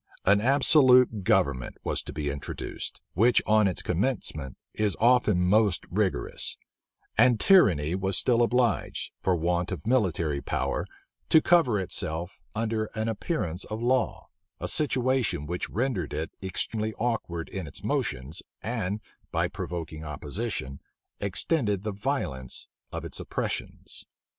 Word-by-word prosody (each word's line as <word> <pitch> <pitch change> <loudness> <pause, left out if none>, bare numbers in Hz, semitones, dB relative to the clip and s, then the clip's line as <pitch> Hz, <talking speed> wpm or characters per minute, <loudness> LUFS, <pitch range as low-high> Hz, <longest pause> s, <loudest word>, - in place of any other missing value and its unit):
An 100 +2 +5
absolute 125 -4 +5
government 65 -7 +1
was - - 0
to - - -8
be 75 -2 -2
introduced, 70 0 -6
which 115 +7 +4
on 110 -1 +4
its 90 - -1
commencement 90 - -1 0.2
is 105 -2 0
often 115 -5 +4
most 100 0 +3
rigorous; 100 0 +1 0.6
and 120 -1 +5
tyranny 90 - +5
was 95 0 0
still 120 -2 +3
obliged, 120 -2 +1
for 95 - +2
want 85 +2 0
of 85 -6 -5
military 85 - +1
power, - - -2 0.4
to 160 - +7
cover 155 -11 +4
itself 85 -1 -4
under 110 0 0
an 110 0 -1
appearance 100 - -2
of 110 0 -5
law; 120 -2 0 0.3
a - - -3
situation 130 - +1
which 90 +3 -3
rendered 115 - -1
it 80 +2 -3
extremely 110 +3 -2
awkward 110 -8 -2
in 95 -4 -5
its 70 - -8
motions, 65 +6 -2 0.2
and, 110 -3 -2 0.3
by - - +1
provoking 80 -2 -6
opposition, 75 - -4 0.4
extended 105 - 0
the 110 - -2
violence 95 - -3 0.2
of - - -5
its - - -5
oppressions. - - -4
100 Hz, 130 wpm, -27 LUFS, 85-120 Hz, 0.6 s, to